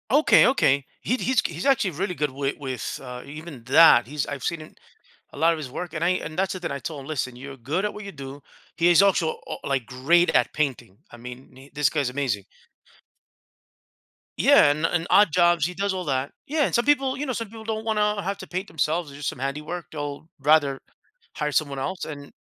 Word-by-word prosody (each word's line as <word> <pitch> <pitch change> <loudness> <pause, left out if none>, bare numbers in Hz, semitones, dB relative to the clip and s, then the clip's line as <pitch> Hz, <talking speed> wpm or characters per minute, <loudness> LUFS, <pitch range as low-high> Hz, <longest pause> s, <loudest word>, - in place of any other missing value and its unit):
Okay, 290 +6 +6
okay. 140 - +2 0.2
He 250 - 0
he's 260 -1 +1
he's 170 +1 -4
actually 255 -9 +3
really 180 +4 -3
good 150 -3 -1
with 140 +1 -2
with, 130 -5 -5
uh, 125 -1 -8
even 150 -3 -10
that. 135 -3 +7
He's 145 +1 -2
I've 140 -3 -6
seen 155 -2 -4 0.6
a - - -13
lot 165 +3 +4
of - - -4
his 145 -4 -6
work, 175 +4 -6
and 160 0 -3
I 175 - +3
and 155 -3 -4
that's 190 0 0
the 185 - -6
thing 175 - -4
that 140 - -3
I - - -5
told 150 -1 -6
him, 135 - -11
"Listen, 130 -5 -3
you're 135 +2 -9
good 145 +10 -2
at 210 - -2
what 210 - -8
you 200 - -7
do." 140 -2 -9 0.4
He 170 +1 +4
is 175 +1 +6
also, 180 -5 +3 0.2
uh, - - -4
uh, - - -9
like, 135 -4 -1
great 160 +9 +2
at - - +2
painting. 135 -10 -2
I 120 - -11
mean, 125 +3 -12
this 150 -1 +2
guy's 145 -5 -1
amazing. 125 -7 -2 1.9
Yeah, 145 - +6
and 155 +2 -1
and 175 0 0
odd 205 -2 +6
jobs, 175 -3 +4
he 180 - -3
does 200 +2 -1
all 185 -1 -4
that. 135 -1 -1 0.2
Yeah, 300 0 +1
and - - -3
some 235 - +2
people, 275 -2 +2
you 290 - -3
know 260 - -2
some 230 -1 -4
people 220 0 -10
don't 220 0 -3
wanna 210 -2 +1
have 195 +2 -3
to - - -9
paint 185 +3 -4
themselves 160 0 -1
or - - -12
do 145 - -11
some 140 - -3
handiwork. 150 +6 -4
They'll 145 0 -6
rather 140 -1 +3 0.6
hire 150 -1 -2
someone 140 -2 0
else, 185 +7 -3
and 145 -2 -9
155 Hz, 225 wpm, -24 LUFS, 140-185 Hz, 1.9 s, that